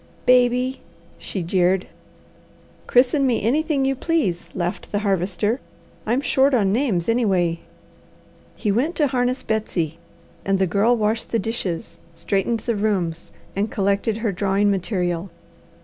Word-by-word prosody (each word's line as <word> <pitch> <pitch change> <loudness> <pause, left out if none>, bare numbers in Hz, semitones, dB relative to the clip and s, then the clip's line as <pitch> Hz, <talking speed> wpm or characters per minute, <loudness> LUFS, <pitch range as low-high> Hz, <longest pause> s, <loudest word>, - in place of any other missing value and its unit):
"Baby!" 250 +1 +3 0.4
she 190 - -4
jeered. 180 +2 +2 1.0
"Christen 265 +3 +3
me 235 -4 0
anything 280 +3 +1
you 270 - +2
please," 270 - -1
laughed 175 -1 -3
the 205 - 0
Harvester. 200 +5 0 0.5
"I'm 240 +5 +2
short 275 -1 +3
on 200 -5 +2
names 220 -9 0
anyway." 190 -8 +1 1.0
He 210 - -1
went 265 - 0
to 300 - +3
harness 255 -1 0
Betsy, 175 -7 -2 0.4
and 195 0 +1
the 190 - +2
Girl 210 +7 +2
washed 220 +1 -1
the 230 - +1
dishes, 200 -6 -4 0.2
straightened 195 +7 -1
the 235 0 -1
rooms, 190 -6 -1 0.2
and 205 +3 0
collected 200 +2 0
her 225 -2 -1
drawing 200 +2 +1
material. 180 -2 -1
210 Hz, 135 wpm, -22 LUFS, 190-245 Hz, 1.0 s, Baby